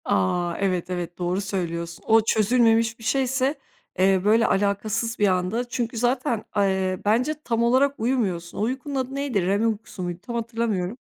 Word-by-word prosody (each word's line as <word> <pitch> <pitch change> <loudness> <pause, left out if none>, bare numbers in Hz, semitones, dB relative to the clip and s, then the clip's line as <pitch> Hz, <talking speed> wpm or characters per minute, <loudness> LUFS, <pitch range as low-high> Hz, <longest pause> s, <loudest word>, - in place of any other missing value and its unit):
A, 170 - +1
evet, 185 -3 -1
evet, 175 -1 -4
doğru 180 +2 -1
söylüyorsun. 170 -4 -4
O 225 0 +6
çözülmemiş 225 +1 +2
bir - - -13
şeyse, 265 +3 +1 0.4
eee, 190 0 +4
böyle 225 +3 +4
alakasız 210 +4 0
bir 205 - +4
anda. 185 +6 0
Çünkü 235 -2 -3
zaten, 245 -1 0
eee, 190 -2 +1
bence 245 +9 +2
tam 230 -1 0
olarak 265 +4 +3
uyumuyorsun. 210 -8 -1
O - - -2
uykunun 260 +5 -2
adı 265 0 -2
neydi? 275 -8 0
REM 200 +4 +2
uykusu 215 -3 -4
muydu? 175 0 -4
Tam 235 - -6
hatırlamıyorum 225 -4 -2
220 Hz, 160 wpm, -24 LUFS, 185-240 Hz, 0.4 s, O